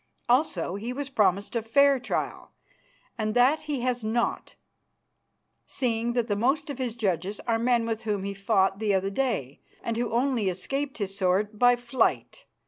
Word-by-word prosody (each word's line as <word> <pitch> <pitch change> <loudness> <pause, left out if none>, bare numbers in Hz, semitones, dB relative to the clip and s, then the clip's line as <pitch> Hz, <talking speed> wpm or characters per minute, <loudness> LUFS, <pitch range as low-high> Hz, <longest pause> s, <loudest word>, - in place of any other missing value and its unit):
Also 240 - +1
he 215 +5 -4
was 275 +1 -5
promised 205 -3 +1
a 230 - +1
fair 275 +5 +4
trial, 250 - -4 0.7
and 215 0 -1
that 260 +6 +4
he 280 -4 -1
has 250 -1 -1
not, 225 +2 -1 1.1
seeing 235 -2 -1
that 240 -2 0
the 205 - 0
most 265 +8 0
of 270 - -8
his 245 -3 -2
judges 195 -2 -1
are 230 -2 0
men 235 -1 +2
with 225 -1 -2
whom 205 -3 -2
he 200 0 -3
fought 195 -1 +1
the 210 -3 +1
other 195 +1 0
day 200 - -2 0.2
and 230 -1 -2
who 240 -1 -1
only 240 -4 +1
escaped 270 +10 -3
his 195 -3 -3
sword 200 +2 0
by 245 0 +6
flight. 245 +1 -1
230 Hz, 170 wpm, -27 LUFS, 200-250 Hz, 1.1 s, by